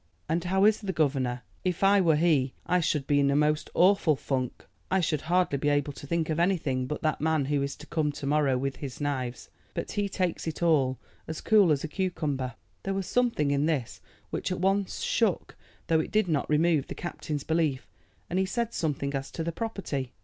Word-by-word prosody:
"And 165 +2 0
how 190 +2 +3
is 215 0 +4
the 200 -3 -2
governor? 130 -6 0 0.2
If 180 0 -1
I 200 0 +6
were 165 -4 +4
he 150 -5 +2
I 180 - +2
should 150 -4 0
be 145 0 +3
in 140 0 +3
a 140 - +2
most 150 +1 +1
awful 180 -4 +4
funk. 130 -2 -3 0.2
I 190 - +2
should 155 -4 0
hardly 175 -3 +1
be 145 - +1
able 145 0 +1
to 145 - -10
think 165 +1 0
of 155 - -1
anything 155 -8 +1
but 150 - -4
that 155 -2 0
man 155 -2 +2
who 145 0 0
is 140 0 -2
to 150 - -12
come 155 -1 0
to 145 - -6
morrow 140 -2 +2
with 135 +1 -2
his 135 -4 -7
knives. 130 -5 -3 0.2
But - - -3
he 205 -1 -1
takes 185 -3 -2
it 160 +1 -3
all 135 -6 +3 0.3
as 160 - -4
cool 205 -6 +5
as 140 -2 +1
a - - -2
cucumber." 150 -8 -2 0.3
There 195 0 -2
was 195 -1 -2
something 230 -14 +1
in 140 +2 +2
this 140 -8 -2 0.3
which - - -2
at 185 - -2
once 195 +1 0
shook, 220 -6 0 0.3
though 160 -1 +3
it 160 - -2
did 215 -2 +2
not 155 -4 0
remove, 155 -1 +3
the - - -6
captain's 150 -4 -4
belief, 160 -5 0 0.4
and 180 +2 -1
he 190 - +2
said 235 +3 -2
something 140 -3 -1
as 135 -1 -3
to 165 - -4
the 170 - -2
property. 165 - -4
155 Hz, 215 wpm, -28 LUFS, 140-180 Hz, 0.4 s, I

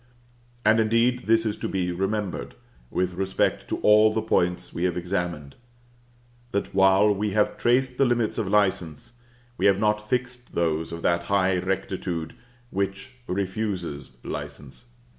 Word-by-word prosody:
And, 110 +1 +5
indeed, 115 +2 +2
this 115 0 +4
is 105 -1 -1
to - - -4
be 90 -2 -1
remembered, 95 - -3 0.3
with 90 0 -1
respect 95 +1 0
to - - -1
all 105 +1 +6
the 110 - 0
points 90 -4 0
we 85 - -1
have 90 -1 0
examined; 85 -5 -3 1.0
that 100 - -2
while 95 +2 +5
we 105 0 -2
have 105 0 +2
traced 125 +1 +1
the 135 - +5
limits 120 -3 0
of 105 - -1
license, 95 -4 0 0.5
we - - +4
have 100 -1 +4
not 105 0 0
fixed 125 -1 -3
those 80 -1 0
of 85 0 -6
that 85 0 +1
high 95 -1 +2
rectitude 90 -3 -3 0.4
which 100 +4 -3 0.2
refuses 95 - -3
license. 70 - -7
95 Hz, 145 wpm, -25 LUFS, 90-110 Hz, 1.0 s, all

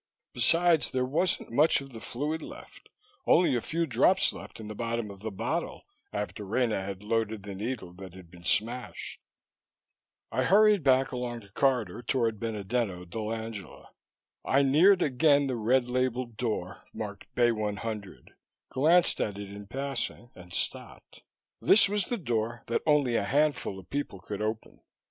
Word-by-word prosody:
Besides, 165 +5 +3
there 130 -1 0
wasn't 160 +4 0
much 150 +7 +4
of 135 -1 -10
the 115 -2 -9
fluid 150 +6 -3
left, - - -12 0.4
only 175 -3 +5
the 120 - +1
few 165 +6 -1
drops 155 +8 +3
left - - -10
in 110 - -8
the 105 - -6
bottom 115 -1 -3
of 100 - -12
the 110 +2 -4
bottle 100 - -3 0.3
after 105 0 -4
Rena 110 0 0
had 100 0 -6
loaded 110 -1 -1
the 100 0 -6
needle 105 -2 -5
that 95 -1 -11
had 90 -3 -13
been 85 -1 -14
smashed. 120 +7 -1 1.1
I - - 0
hurried 210 +1 +5
back 135 -2 +3
along 125 -2 -4
the 100 - -17
corridor 120 -3 0
toward 115 -3 0
Benedetto 105 -3 -2
dell'Angela. 110 +2 -6 0.5
I 140 +1 +3
neared 175 +8 +5
again 145 +1 +3
the 130 -2 -1
red 120 +3 +2
labeled 125 -1 -1
door 105 -6 -3
marked - - -6
Bay 120 -1 +4
100, 105 -2 -4 0.4
glanced 165 +6 +4
at 100 -2 -2
it 100 -1 -7
in 100 0 -9
passing 135 -2 -4
and 90 -1 -14
stopped. - - -5 0.4
This 210 - +7
was 205 -1 0
the 240 - -2
door 120 - -2
that 115 - -1
only 140 -6 +3
a - - 0
handful 145 -3 +1
of 95 -2 -12
people 140 -9 -3
could 105 +2 -6
open. 110 +1 -4
120 Hz, 160 wpm, -29 LUFS, 105-140 Hz, 1.1 s, This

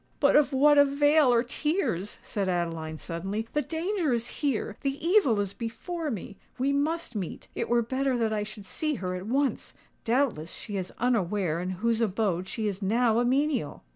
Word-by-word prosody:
"But 280 - +4
of 295 -1 +5
what 290 +2 +5
avail 285 0 +5
are 235 -1 +4
tears?" 260 - -1
said 195 -3 -2
Adeline, 165 -3 -2
suddenly. 195 +8 -4
"The 295 - +2
danger 330 -1 -1
is 235 0 -1
here—the 275 +2 -2
evil 345 - +4
is 200 -1 -1
before 310 - -4
me. 205 -4 -6 0.2
We 275 +2 +1
must 310 +1 -1
meet:—it 190 -5 -5
were 240 0 +3
better 260 +2 0
that 225 -2 0
I 210 - 0
should 210 -1 -7
see 305 - -2
her 185 -5 -3
at 185 +2 -5
once! 275 +3 -1 0.3
Doubtless 230 - 0
she 205 - -6
is 185 -2 -3
unaware 200 -8 +1
in 180 +1 -3 0.2
whose 230 0 +2
abode 190 -4 0
she 220 +2 -2
is 200 0 -3
now 225 +3 +2
a - - +3
menial!" 265 - 0
235 Hz, 175 wpm, -28 LUFS, 195-280 Hz, 0.3 s, of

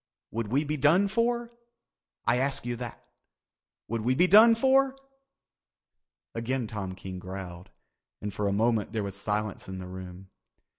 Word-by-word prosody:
Would 115 -1 -2
we 135 +7 +1
be 150 0 -2
done 160 +8 +4
for? 235 +2 0 0.7
I 125 - +3
ask 135 -1 0
you 120 0 -2
that. 120 -2 -8 0.8
Would 115 0 -2
we 125 +4 +1
be 175 - +5
done 220 +5 +8
for?" 265 +2 +3 1.4
Again 120 +2 -2
Tom 100 -4 -5
King 95 0 -7
growled 90 -1 -8 0.5
and 105 -1 -5
for 105 - -1
a - - +1
moment 110 0 +1
there 110 -2 -1
was 100 -1 -5
silence 105 0 -3
in 95 - -5
the 90 - -6
room. 95 +1 -9
115 Hz, 155 wpm, -28 LUFS, 95-150 Hz, 1.4 s, done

